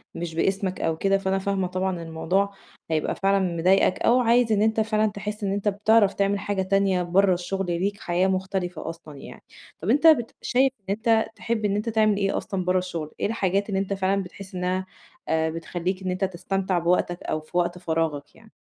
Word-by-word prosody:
مش 165 Hz, -1 st, -5 dB
بإسمك 190 Hz, +1 st, -1 dB
أو 160 Hz, -1 st, 0 dB
كده، 195 Hz, +2 st, +2 dB
فأنا 195 Hz, 0 st, -1 dB
فاهمة 195 Hz, -1 st, -1 dB
طبعًا 185 Hz, -1 st, -2 dB
الموضوع 180 Hz, +5 st, -1 dB, 0.4 s
هيبقى 155 Hz, -1 st, 0 dB
فعلًا 195 Hz, 0 st, +2 dB, 0.2 s
مضايقك، 185 Hz, +2 st, +3 dB
أو 250 Hz, +2 st, +4 dB
عايز 235 Hz, -1 st, +3 dB
إن 210 Hz, -1 st, +3 dB
أنت 220 Hz, 0 st, +2 dB
فعلًا 215 Hz, 0 st, +2 dB
تحس 210 Hz, +1 st, -6 dB
إن 195 Hz, -, 0 dB
أنت 205 Hz, +1 st, -2 dB
بتعرف 205 Hz, 0 st, +3 dB
تعمل 200 Hz, 0 st, 0 dB
حاجة 200 Hz, -1 st, -2 dB
تانية 190 Hz, -1 st, +1 dB
برّه 185 Hz, +2 st, +3 dB
الشغل، 190 Hz, +2 st, -3 dB
ليك 185 Hz, +4 st, -1 dB
حياة 180 Hz, +2 st, +1 dB
مختلفة 185 Hz, -3 st, -2 dB
أصلًا 160 Hz, -3 st, -10 dB
يعني، -, -, -11 dB, 0.4 s
طَب 180 Hz, -, -3 dB
أنت 290 Hz, +7 st, +5 dB
بت 240 Hz, -8 st, +4 dB
شايف 260 Hz, +1 st, +2 dB
إن 195 Hz, -, -43 dB
أنت 220 Hz, 0 st, +2 dB
تحب 225 Hz, -2 st, -2 dB
إن 200 Hz, 0 st, +1 dB
أنت 210 Hz, +2 st, -1 dB
تعمل 215 Hz, -2 st, +2 dB
إيه 195 Hz, -1 st, 0 dB
أصلًا 185 Hz, -2 st, -3 dB
برّه 185 Hz, 0 st, +2 dB
الشغل؟ 170 Hz, -4 st, -4 dB
إيه -, -, 0 dB
الحاجات 200 Hz, -2 st, 0 dB
اللي 190 Hz, -1 st, 0 dB
أنت 200 Hz, 0 st, -2 dB
فعلًا 195 Hz, 0 st, 0 dB
بتحس 185 Hz, +1 st, -11 dB
إنها 185 Hz, +1 st, -1 dB, 0.4 s
آآ، 160 Hz, 0 st, +1 dB
بتخلّيك 175 Hz, +3 st, -4 dB
إن 185 Hz, -, -1 dB
أنت 185 Hz, +2 st, -2 dB
تستمتع 190 Hz, 0 st, -1 dB
بوقتك 175 Hz, +1 st, 0 dB
أو 155 Hz, -, -2 dB
في 155 Hz, +3 st, -6 dB
وقت 175 Hz, 0 st, +1 dB
فراغك 160 Hz, -4 st, -2 dB
يعني؟ 225 Hz, -1 st, -19 dB
195 Hz, 200 wpm, -25 LUFS, 180-205 Hz, 0.4 s, أنت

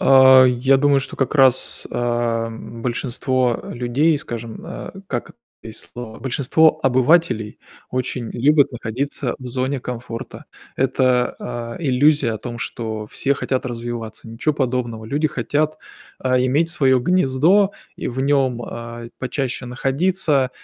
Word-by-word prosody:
А, 130 Hz, -1 st, +8 dB
я 130 Hz, +2 st, +3 dB
думаю, 140 Hz, 0 st, +3 dB
что 135 Hz, -, -7 dB
как 135 Hz, -, -1 dB
раз, 130 Hz, -3 st, +3 dB
а, 120 Hz, -1 st, 0 dB
м, 115 Hz, 0 st, -9 dB
большинство 125 Hz, 0 st, 0 dB
людей, 135 Hz, +6 st, +1 dB
скажем, 115 Hz, -6 st, -7 dB
э, -, -, -7 dB, 0.2 s
как -, -, -4 dB, 0.3 s
есть 110 Hz, -1 st, -8 dB
слово, 120 Hz, -2 st, -8 dB
большинство 145 Hz, +4 st, +3 dB
обывателей 130 Hz, -4 st, +2 dB, 0.3 s
очень 125 Hz, -2 st, -3 dB
любят 145 Hz, +3 st, +3 dB
находиться 125 Hz, +2 st, -3 dB
в 130 Hz, -, -9 dB
зоне 130 Hz, +2 st, -1 dB
комфорта. 120 Hz, 0 st, -7 dB, 0.3 s
Это, 130 Hz, -1 st, +1 dB, 0.4 s
э, -, -, -9 dB
иллюзия 140 Hz, -1 st, +3 dB
о 110 Hz, -, -4 dB
том, 120 Hz, 0 st, -7 dB
что 110 Hz, -2 st, -4 dB
все 135 Hz, +5 st, 0 dB
хотят 130 Hz, -2 st, -2 dB
развиваться- 120 Hz, -2 st, -6 dB
ничего 115 Hz, +7 st, -1 dB
подобного. 120 Hz, -5 st, -2 dB
Люди 145 Hz, +7 st, 0 dB
хотят, 150 Hz, +5 st, -1 dB, 0.4 s
а, 130 Hz, -1 st, +1 dB
иметь 135 Hz, +6 st, +2 dB
своё 135 Hz, -6 st, +3 dB
гнездо 180 Hz, +6 st, +3 dB, 0.2 s
и -, -, -4 dB
в 125 Hz, +1 st, -4 dB
нём, 135 Hz, -3 st, +1 dB
а, 115 Hz, 0 st, -7 dB
почаще 130 Hz, 0 st, -3 dB
находиться. 140 Hz, +2 st, +1 dB
130 Hz, 135 wpm, -20 LUFS, 120-140 Hz, 0.4 s, А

